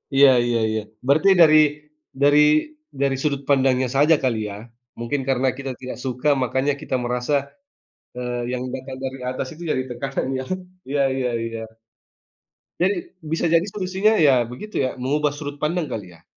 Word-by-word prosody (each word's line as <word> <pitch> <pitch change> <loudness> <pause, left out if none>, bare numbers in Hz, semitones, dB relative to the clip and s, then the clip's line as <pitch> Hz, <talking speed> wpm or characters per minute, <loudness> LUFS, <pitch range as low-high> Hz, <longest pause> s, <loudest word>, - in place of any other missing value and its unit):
Iya 140 0 +8 0.2
iya 120 -1 +1
iya. 110 0 -1 0.3
Berarti 155 +8 +4
dari 155 -2 +8 0.7
dari 145 +1 +6 0.6
dari 135 -1 +2
sudut 140 -2 -1
pandangnya 130 -2 +3
saja 150 +4 +5
kali 125 -4 +1
ya. 100 - -7 0.4
Mungkin 125 +4 -2
karena 130 0 +2
kita 135 -1 -4
tidak 125 -2 -6
suka 130 +3 0
makanya 130 +3 0
kita - - -2
merasa, 125 +3 -1 0.8
eee, 120 -1 -3
yang 125 0 -3
datang 130 0 -6
dari 130 0 -4
atas 130 +1 -3
itu 160 - -14
jadi 130 - 0
tekanan 135 +3 -3
ya - - -3
kan? 185 0 -2 0.3
Iya 140 0 +1
iya 125 -2 -1 0.2
iya. 115 0 -5 1.2
Jadi 195 +3 +3 0.4
bisa 165 - 0
jadi 165 +2 +4
solusinya 195 +2 +1
ya 145 -3 +6 0.2
begitu 210 - -9
ya - - 0
mengubah 145 +3 0
sudut 145 -1 -7
pandang 155 +2 -1
kali 95 -5 -6
ya? 80 - -21
135 Hz, 165 wpm, -22 LUFS, 125-150 Hz, 1.2 s, Iya